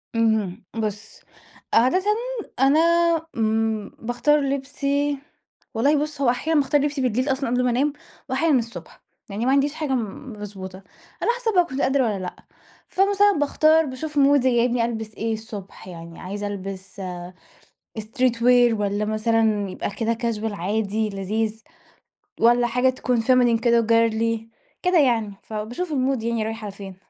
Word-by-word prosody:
اهم 220 -3 +1
بُصّ، 215 -1 -4 0.5
عادةً 260 +11 +4 0.6
أنا 275 +4 +5 0.6
امم 220 -1 0
باختار 245 +6 +2
لبسي 280 +1 -1 0.6
والله 285 +6 +2
بُص 300 -2 -4
هو 250 - +4
أحيانًا 300 +6 +1
باختار 285 +1 +2
لبسي 290 -1 -1
بالليل 255 +2 +1
أصلًا 265 -1 -1
قبل 250 +1 +1
ما 250 - +2
أنام، 275 +5 +1 0.4
وأحيانًا 270 0 +3
الصبح. 230 0 -8 0.3
يعني 205 +4 -3
ما 260 - +3
عنديش 280 +2 +2
حاجة 295 -4 -2
م 240 +3 -5
مضبوطة. 195 -3 -8 0.4
على - - +3
حسب 455 -2 -1
بقى 355 -1 +5
كنت 275 -3 -4
قادرة 265 +1 +2
والّا 210 -5 -1
لأ. 180 - -5 0.5
فمثلًا 405 +1 +3
باختار 310 +2 +4
باشوف 295 +3 -6
مودي 275 -3 +4
جايبني 240 0 +2
ألبس 220 -2 -5
إيه 225 +1 -2
الصبح 215 -4 -8
يعني، 170 -2 -10
عايزة 205 +2 -5
ألبس 195 -1 -7 1.0
street 240 +3 0
wear 245 0 +5
والّا 205 +1 0
مثلًا 215 -1 +1
يبقى - - -4
كده 225 +3 -1
casual 225 -2 -2
عادي 210 +3 -1
لذيذ 215 +3 -2 0.8
والّا 240 +1 +5
حاجة 250 +2 +2
تكون 250 -2 -1
feminine 245 -1 +3
كده 235 -1 +3
وgirly 230 0 +2 0.4
كده 360 -1 +3
يعني. 230 -7 +2
فباشوف 230 +11 -5
المود 265 -3 0
يعني 230 -1 -1
رايح 225 0 -5
على 205 - -5
فين. 195 -1 -10
235 Hz, 150 wpm, -23 LUFS, 215-275 Hz, 1.0 s, أنا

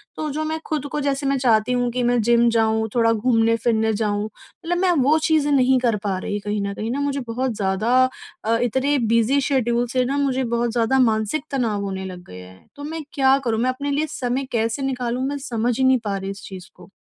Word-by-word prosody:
तो 310 -1 -3
जो 310 +2 -2
मैं 315 +1 -2
खुद 300 -3 -2
को 300 - -2
जैसे 280 0 -1
मैं 275 0 +1
चाहती 235 -2 +2
हूँ 245 -1 +1
कि 250 +1 -2
मैं 240 0 +2
जिम 235 +1 +4
जाऊँ, 220 -1 +1
थोड़ा 230 -1 +4
घूमने-फिरने 225 -1 +1
जाऊँ 205 -1 -1
मतलब 340 - -6
मैं 365 0 +2
वो 300 +4 +4
चीज़ें 300 -2 +2
नहीं 260 -1 +4
कर 235 -4 +1
पा 195 -2 -1
रही। 205 +2 -3
कहीं 205 0 -3
न 200 0 -3
कहीं 220 +3 -4
ना 280 - -2
मुझे 280 -1 -1
बहुत 250 +2 -1
ज़्यादा 200 +4 0 0.5
अ, 230 +1 +2
इतने 265 +4 +1 0.2
बिज़ी 230 +5 +3
शेड्यूल 245 -3 +1
से 255 -1 +2
न 280 +2 -1
मुझे 265 -1 0
बहुत 235 0 0
ज़्यादा 240 +3 +1
मानसिक 225 +4 +1
तनाव 225 -7 -1
होने 190 -1 -4
लग 180 -1 -8
गया 90 0 -11
है। 95 - -20
तो 285 - -9
मैं 320 +1 -5
क्या 270 -1 +4
करूँ? 225 -1 0
मैं 255 +2 +1
अपने 280 +2 -3
लिए 305 +2 0
समय 255 +2 -1
कैसे 230 +3 -1
निकालूँ 250 -1 -2
मैं 285 0 -3
समझ 240 -3 -2
ही - - +2
नहीं 260 -1 +4
पा 200 -1 -1
रही 195 0 -5
इस 195 - -10
चीज़ 185 -2 -10
को। - - -16
240 Hz, 230 wpm, -22 LUFS, 220-275 Hz, 0.5 s, जिम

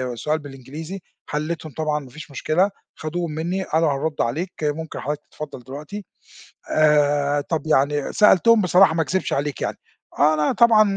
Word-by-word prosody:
سؤال 155 +7 -1
بالإنجليزي، 145 +6 -8 0.3
حلّيتهم 155 +1 -3
طبعًا 155 -1 0
ما 135 -3 -12
فيش 150 +2 -11
مشكلة، 170 +8 +1 0.3
خدوهم 165 +1 -3
منّي 175 +5 -2
قالوا 160 -3 +1
هنرد 150 +2 -2
عليك 160 +10 -1
ممكن 150 +2 -2
حضرتك 150 +1 -3
تتفضل 150 -4 -7
دلوقتي 150 - -8 0.7
آآ، 145 -1 +3
طَب 155 0 -3
يعني 145 -1 +1
سألتهم 210 +2 +5
بصراحة 180 -1 +5
ما 160 - +2
اكذبش 190 +4 -1
عليك 145 0 -1
يعني، - - -2 0.4
أنا 150 0 +3
طبعًا 230 -2 +6
155 Hz, 150 wpm, -22 LUFS, 145-170 Hz, 0.7 s, طبعًا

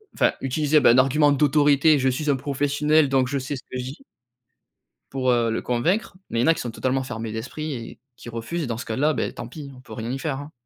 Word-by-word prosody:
enfin - - +3
utiliser 150 +3 +2
bah - - +5
un 120 - +4
argument 145 +3 +4
d'autorité: 145 +1 +4
«Je 130 0 +2
suis 150 +4 -2
un 140 - +4
professionnel 145 +2 +1
donc 130 -1 +2
je 140 +2 -2
sais 135 +2 -4
ce 125 - -9
que 130 - -7
je 125 - -3
dis» 135 +3 -7 1.1
pour, 130 -1 +1
heu, 120 -1 +2
le 115 - -2
convaincre. 180 - -1
Mais 115 - -1
il - - +3
y - - +2
en - - +1
a 165 - +6
qui - - -7
sont 120 - -4
totalement 130 +3 -1
fermés 115 -3 -5
d'esprit 140 +7 -5
et 115 -2 -8 0.2
qui - - -13
refusent 120 +8 -4
dans 115 -2 -3
ce 120 - -6
cas-là, 145 +8 +1
beh - - -2
tant 115 - -7
pis 140 +1 -9
on - - -14
peut - - -12
rien 115 +1 -4
y 135 - -3
faire, 135 -2 -3
hein. 145 +2 -9
135 Hz, 260 wpm, -23 LUFS, 125-150 Hz, 1.1 s, a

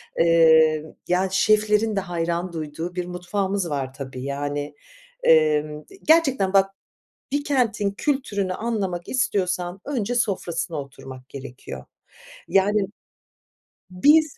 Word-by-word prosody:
emm, 160 -2 +4 0.2
yani 185 +2 +1
şeflerin 215 +1 +3
de - - +2
hayran 175 -1 -2
duyduğu 160 +3 -5
bir 180 - -2
mutfağımız 185 +1 -2
var 135 -3 -3
tabii 130 -2 -7
yani, 145 +1 -3 0.5
emm, 150 -1 +3 0.2
gerçekten 270 - +3
bak, 195 0 +4 0.6
bir 285 0 0
kentin 230 -8 +1
kültürünü 205 -6 -1
anlamak 195 -7 -3
istiyorsan 185 -6 -1
önce 245 -5 -2
sofrasına 180 -8 -1
oturmak 130 -1 -11
gerekiyor. 135 -2 -9 0.6
Yani 200 +1 +3 1.0
biz, 295 +12 +4
180 Hz, 105 wpm, -23 LUFS, 155-210 Hz, 1.0 s, emm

